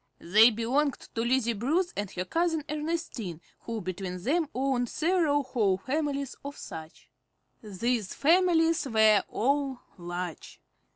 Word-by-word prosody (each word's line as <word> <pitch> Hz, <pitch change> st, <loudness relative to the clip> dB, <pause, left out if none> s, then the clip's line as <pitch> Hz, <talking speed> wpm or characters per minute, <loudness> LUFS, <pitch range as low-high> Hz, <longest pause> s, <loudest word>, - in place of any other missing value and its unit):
They 215 Hz, +7 st, +6 dB
belonged 250 Hz, +5 st, 0 dB, 0.2 s
to 225 Hz, -, -1 dB
Lizzie 235 Hz, 0 st, +1 dB
Bruce 315 Hz, -, 0 dB
and 205 Hz, -1 st, -3 dB
her 180 Hz, 0 st, -4 dB
cousin 325 Hz, -, 0 dB
Ernestine, 300 Hz, -, -4 dB, 0.3 s
who 230 Hz, -2 st, -4 dB
between 185 Hz, 0 st, -5 dB
them 315 Hz, -, +1 dB
owned 255 Hz, -2 st, 0 dB
several 320 Hz, -4 st, +1 dB
whole 215 Hz, -8 st, +1 dB
families 280 Hz, +4 st, -2 dB
of 285 Hz, +1 st, -7 dB
such. 160 Hz, 0 st, -9 dB, 0.5 s
These 215 Hz, +1 st, -2 dB
families 330 Hz, -1 st, +3 dB
were 220 Hz, -4 st, +5 dB
all 275 Hz, +1 st, 0 dB, 0.2 s
large. 175 Hz, -1 st, -6 dB
250 Hz, 125 wpm, -28 LUFS, 205-300 Hz, 0.5 s, They